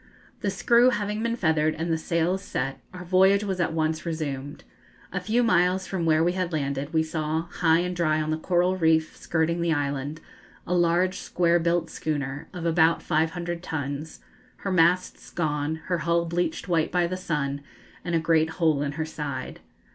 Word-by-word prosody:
The 205 - -1
screw 235 +5 +4
having 210 -2 -2
been 230 0 0
feathered 160 -6 +1
and 165 +1 -1
the - - +3
sails 170 +3 0
set, 135 -8 -3
our 180 -1 -8
voyage 190 +3 +4
was 190 -3 -2
at 170 - +1
once 155 -1 -1
resumed. 145 -4 -4 0.5
A 180 - 0
few 220 +6 +1
miles 185 -4 +2
from 175 -4 -2
where 155 0 +4
we 175 - +3
had 180 -1 -2
landed, 140 -1 -2
we 160 -1 +2
saw, 160 0 -2
high 165 -1 +3
and 180 0 -3
dry 155 -3 +1
on 155 0 -1
the 155 - 0
coral 180 +2 +2
reef 160 -2 +2
skirting 170 +1 -1
the 170 -1 +2
island, 145 +1 -2 0.5
a 180 - -2
large 175 +1 +2
square 175 -1 +2
built 170 +1 0
schooner, 145 -2 -3
of 180 -3 -6
about 165 0 +3
500 170 +2 -1
tons, 150 -2 -5 0.3
her 195 - -4
masts 180 +1 +2
gone, 150 -2 -1
her 180 -2 -1
hull 170 +1 +1
bleached 170 -1 -2
white 165 -3 +1
by 175 -1 +2
the 180 +2 -2
sun, 150 -6 -2 0.4
and 175 -1 -1
a - - +3
great 160 -1 +2
hole 160 -5 +2
in 145 0 -2
her 160 +2 -2
side. 145 -4 -5
165 Hz, 185 wpm, -26 LUFS, 155-180 Hz, 0.5 s, screw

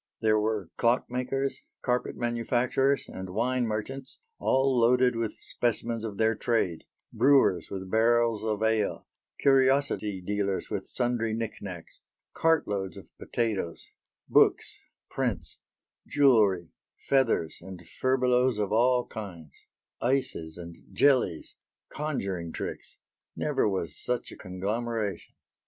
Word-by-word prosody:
There 110 -1 +3
were 105 -4 -1
clockmakers, 125 +3 0 0.3
carpet 125 -1 0
manufacturers 120 +3 +1
and 95 0 -7
wine 120 +5 0
merchants, 130 +6 -5 0.2
all 135 0 +2
loaded 125 +1 +4
with 115 -2 -2
specimens 115 -1 -2
of 105 -3 -5
their 110 0 +3
trade; 105 -7 -1 0.3
brewers 130 -6 +4
with 95 -1 -5
barrels 115 0 +3
of 110 -1 -1
ale, 110 -2 0 0.4
curiosity 135 -7 +3
dealers 100 +1 -2
with - - -3
sundry 120 -2 -1
knickknacks; 100 -6 -6 0.3
cartloads 105 -13 +1
of - - -14
potatoes; 105 -8 -2 0.4
books, - - +3 0.3
prints, - - -3 0.5
jewellery, 105 - +3 0.4
feathers 125 -12 +2
and 95 0 -10
furbelows 125 -2 +2
of 105 -2 -1
all 125 +3 +3
kinds; 85 - -8 0.5
ices 120 -11 -1
and 85 -1 -9
jellies; 130 - +2 0.3
conjuring 100 - -3
tricks; - - -6 0.4
never - - +1
was 95 -4 -2
such 125 -1 -3
a - - -9
conglomeration. 105 +1 -3
115 Hz, 110 wpm, -28 LUFS, 100-125 Hz, 0.5 s, loaded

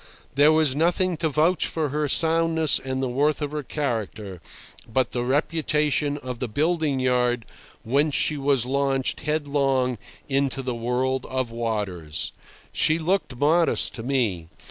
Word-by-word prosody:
There 145 +2 +5
was 155 -4 +2
nothing 175 +3 +1
to 160 0 0
vouch 155 +4 +2
for 155 -3 -2
her 150 +2 -1
soundness 160 0 +3
and 130 0 -3
the - - 0
worth 145 +4 +1
of 145 -2 -3
her 150 0 -3
character, 110 - -4 0.5
but 130 +3 +1
the 120 - -2
reputation 150 +1 0
of 125 -4 -7
the 125 - -2
building 150 +3 0
yard 125 -2 +1 0.4
whence 140 +5 +1
she 155 - +2
was 135 -3 +1
launched 135 0 0
headlong 140 -5 0 0.3
into 135 -1 0
the 125 -1 -2
world 125 +2 -1
of 130 -3 -2
waters. 100 -10 -3 0.4
She 155 - +3
looked 175 -4 -1
modest 160 +6 +2
to 120 - -5
me. 115 -10 -1
135 Hz, 145 wpm, -24 LUFS, 125-150 Hz, 0.5 s, There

